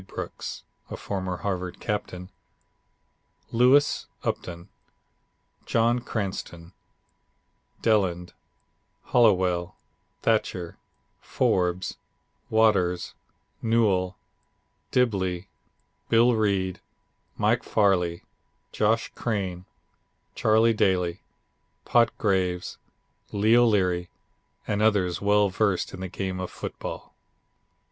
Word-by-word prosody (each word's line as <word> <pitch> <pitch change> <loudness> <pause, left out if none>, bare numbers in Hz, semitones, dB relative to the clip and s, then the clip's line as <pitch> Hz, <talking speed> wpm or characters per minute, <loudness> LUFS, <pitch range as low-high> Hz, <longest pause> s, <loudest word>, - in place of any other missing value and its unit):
Brooks, - - -6 0.3
a - - -6
former 95 -2 -3
Harvard 90 -2 -3
captain, 100 -3 -4 1.2
Lewis, 130 +5 +4 0.2
Upton, 85 +2 -4 1.0
John 120 +1 +2
Cranston, 95 -6 -5 1.1
Deland, 95 -6 +1 0.8
Hallowell, 95 -6 +3 0.5
Thatcher, 95 -6 0 0.4
Forbes, 90 0 0 0.5
Waters, 100 -6 +2 0.5
Newell, 100 -6 +1 0.7
Dibblee, 95 -7 0 0.6
Bill 120 +2 +5
Reid, 100 -4 0 0.6
Mike - - +2
Farley, 90 -5 +1 0.5
Josh 110 +2 +1
Crane, 95 -6 -3 0.7
Charlie 110 +1 +3
Daly, 95 -5 +1 0.6
Pot 120 -1 +4
Graves, 90 -4 -1 0.5
Leo 110 +4 +4
Leary, 90 -5 +1 0.6
and 105 0 -1
others 100 -5 +2
well 105 0 +3
versed 95 -1 0
in 95 - -7
the 95 - -4
game 95 0 -4
of 90 - -4
football. - - -7
95 Hz, 80 wpm, -26 LUFS, 90-110 Hz, 1.2 s, Bill